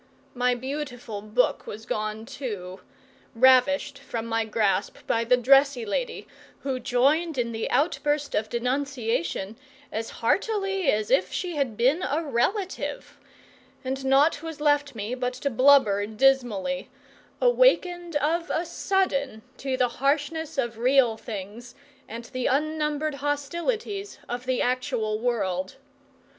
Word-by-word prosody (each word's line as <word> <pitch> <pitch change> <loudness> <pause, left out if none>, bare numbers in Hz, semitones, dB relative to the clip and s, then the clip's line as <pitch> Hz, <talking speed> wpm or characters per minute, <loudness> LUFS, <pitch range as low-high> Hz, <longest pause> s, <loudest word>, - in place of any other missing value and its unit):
My 250 0 +1
beautiful 250 -5 -5
book 215 +4 0
was 220 +2 -7
gone 215 +1 -3
too 205 -9 -6 0.6
ravished 260 +3 +4
from 235 -4 -5
my 225 -1 0
grasp 210 -2 0
by 230 - +1
the 250 +2 +4
dressy 270 0 +4
lady, 480 - -3 0.3
who 265 -2 -2
joined 275 +6 +1
in 235 -1 0
the 225 -1 -3
outburst 295 -1 0
of 215 0 0
denunciation 235 -5 -2 0.3
as 225 +1 -3
heartily 390 - 0
as 210 0 -1
if 185 0 +3
she 355 -3 -3
had 265 -7 -1
been 265 +9 +3
a 315 +1 -1
relative 340 - -2 0.6
and 265 +1 -3
naught 280 +3 +3
was 320 -2 -7
left 290 -2 +2
me 215 +2 -4
but 250 0 -2
to 280 +2 -2
blubber 230 -6 +5
dismally, 265 +1 +1 0.5
awakened 360 -9 +3
of 325 +4 0
a 335 - -1
sudden 280 - -1
to 265 -1 -2
the 250 -1 +3
harshness 295 +3 0
of 235 -4 -2
real 250 -2 +4
things 220 +3 -8 0.3
and 230 +1 -7
the 255 +1 -3
unnumbered 300 +1 0
hostilities 345 - -2
of 245 +1 -5
the 255 -1 +1
actual 245 -4 -1
world. 195 -5 -1
260 Hz, 130 wpm, -26 LUFS, 230-295 Hz, 0.6 s, blubber